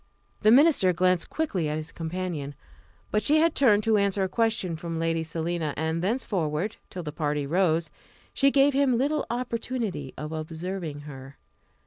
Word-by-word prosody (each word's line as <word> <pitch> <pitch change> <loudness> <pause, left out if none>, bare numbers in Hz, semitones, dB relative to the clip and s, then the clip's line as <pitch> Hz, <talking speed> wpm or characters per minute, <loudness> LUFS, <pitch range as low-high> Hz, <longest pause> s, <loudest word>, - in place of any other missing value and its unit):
The 215 - +5
minister 250 - +5
glanced 180 0 +1
quickly 195 - -1
at 150 - -2
his 155 +1 -5
companion. 165 -4 -4 0.6
But 210 - +2
she 300 +6 +4
had 325 +1 +3
turned 215 -6 +4
to 220 0 +3
answer 200 -1 +1
a - - +1
question 220 -4 0
from 165 +1 -5
Lady 165 0 0
Selina, 160 -1 -3
and 160 +1 -1
thenceforward, 190 - -1
till 180 - -6
the 150 - -5
party 150 -1 -1
rose, 165 +1 +1 0.4
she 275 - +4
gave 275 +1 +4
him 270 -3 +3
little 290 +4 0
opportunity 230 - -3
of 150 +2 -5
observing 160 0 -5
her. 135 -1 -10
180 Hz, 160 wpm, -26 LUFS, 160-230 Hz, 0.6 s, The